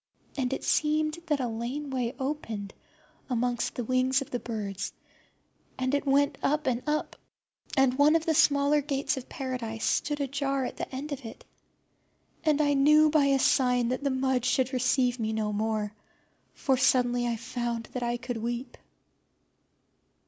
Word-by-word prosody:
And 260 -2 -1
it 270 - -3
seemed 310 +1 +1
that 300 -3 +1
a 255 - -1
lane 245 +6 -4
way 250 -1 -2
opened 230 -8 -4 0.6
amongst 245 -1 -1
the 245 - -2
wings 255 +2 +2
of - - -19
the 245 - -1
birds, 205 -5 -4 0.8
and 260 +1 -1
it 285 0 0
went 280 +1 +2
up 300 +2 +1
and 250 -2 0
up, 300 +1 -1 0.6
and 270 -2 +4
one 300 +2 +6
of 325 -1 +1
the 320 - +2
smaller 290 0 +4
gates 275 -1 -1
of 260 -2 -8
Paradise 245 -5 -4
stood 295 0 0
ajar 275 -1 -1
at - - -6
the - - -4
end 280 +3 -5
of 280 -2 -5
it. 225 - -10 1.0
And 305 -2 +2
then 300 - +3
I 290 - +3
knew 300 +2 +5
by 300 -2 +4
a 275 -1 +4
sign 250 -2 +3
that 255 +2 -2
the 280 - +1
mud 260 -2 0
should 255 +1 +1
receive 250 0 +1
me 220 -1 -1
no 215 -1 -1
more, 215 0 -1 0.6
for 265 -2 +1
suddenly 245 -1 +2
I 235 - 0
found 235 0 -3
that 250 - -3
I 240 0 -1
could 245 -1 -5
weep. 240 +3 -4
260 Hz, 170 wpm, -28 LUFS, 240-280 Hz, 1.0 s, one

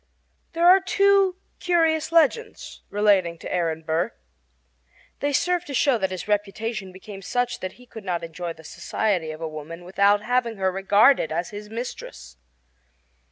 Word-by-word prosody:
There 335 +1 +1
are 370 +2 +8
two 395 0 +3 0.2
curious 325 -2 +1
legends 335 - +1
relating 200 -5 +2
to - - -7
Aaron 165 -3 -1
Burr. 160 +2 -1 1.1
They 285 - 0
serve 355 +5 +1
to 280 - -5
show 250 -1 +3
that 190 -2 0
his 185 0 -6
reputation 210 0 -2
became 195 +1 -10
such 245 +5 -1
that 185 - -5
he 250 - -17
could 225 -3 -11
not 175 -3 -2
enjoy 165 +1 -5
the 160 - -16
society 180 +1 -2
of 155 +1 -7
a 165 - -2
woman 155 +3 -8
without 200 +3 +3
having 240 -2 0
her 190 -1 +1
regarded 200 - +4
as 170 +2 -2
his 210 0 -8
mistress. 70 - -7
205 Hz, 160 wpm, -24 LUFS, 175-255 Hz, 1.1 s, are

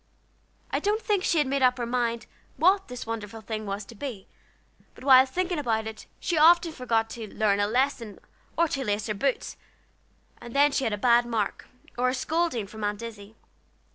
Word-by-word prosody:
I - - +1
don't 415 +2 0
think 415 -4 0
she 340 - +1
had 300 - +3
made 275 +1 -1
up 255 0 +4
her 240 - -2
mind 235 -1 -1 0.3
what 385 +3 +3
this 250 -1 -7
wonderful 225 -1 -5
thing 215 0 -5
was 200 +1 -4
to 235 - -12
be; 230 -4 -7 0.7
but - - -14
while 260 -1 +7
thinking 355 +4 -2
about 225 -5 0
it 220 -1 -8
she 340 -4 0
often 335 +2 +6
forgot 235 -6 0
to 220 -3 -7
learn 205 -2 +1
a 205 - +2
lesson, 240 -2 -1 0.4
or 335 - +4
to 270 -2 -2
lace 210 -2 -1
her 215 - -2
boots, 255 +6 -2 0.8
and 240 +1 -10
then 290 +1 +5
she 270 - 0
had 220 - 0
a - - -1
bad 240 +2 +4
mark, 220 -4 -2 0.3
or 255 +1 +3
a 255 - -1
scolding 310 -4 -1
from 215 +2 -9
Aunt 205 +2 -2
Izzie. 220 -2 -9
240 Hz, 200 wpm, -26 LUFS, 220-280 Hz, 0.8 s, while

